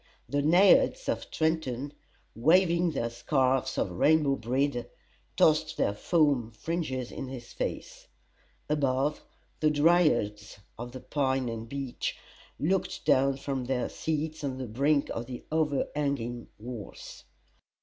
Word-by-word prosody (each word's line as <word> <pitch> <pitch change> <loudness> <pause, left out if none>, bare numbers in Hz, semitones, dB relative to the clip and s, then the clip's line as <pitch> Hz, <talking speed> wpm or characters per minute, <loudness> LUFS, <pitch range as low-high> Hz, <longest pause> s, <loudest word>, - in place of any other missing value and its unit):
The 145 0 0
naiads 190 - +5
of - - -2
Trenton, 145 -4 -1 0.4
waving 170 +6 +4
their 120 -6 -2
scarfs 130 +1 +1
of 90 - 0
rainbow 145 - +3
brede, 125 +1 -1 0.5
tossed 155 0 +3
their 100 - +1
foam 140 - +2
fringes 130 0 -3
in 135 - -6
his 130 -2 -9
face: - - -5 0.6
above, 140 0 0 0.4
the 155 - +3
dryads 145 -11 +2 0.2
of 120 +1 -7
the 130 - -7
pine 135 -3 0
and 115 0 -6
beech 135 -2 -4 0.4
looked 185 +3 -1
down 135 +1 +3
from 135 -2 -3
their 125 -1 -1
seats 155 0 -3
on 135 -2 -2
the 130 - -4
brink 140 +6 +1
of 115 +1 -4
the 125 -2 -7
overhanging 140 -5 -1
walls. 115 -2 -9
140 Hz, 125 wpm, -29 LUFS, 120-155 Hz, 0.6 s, naiads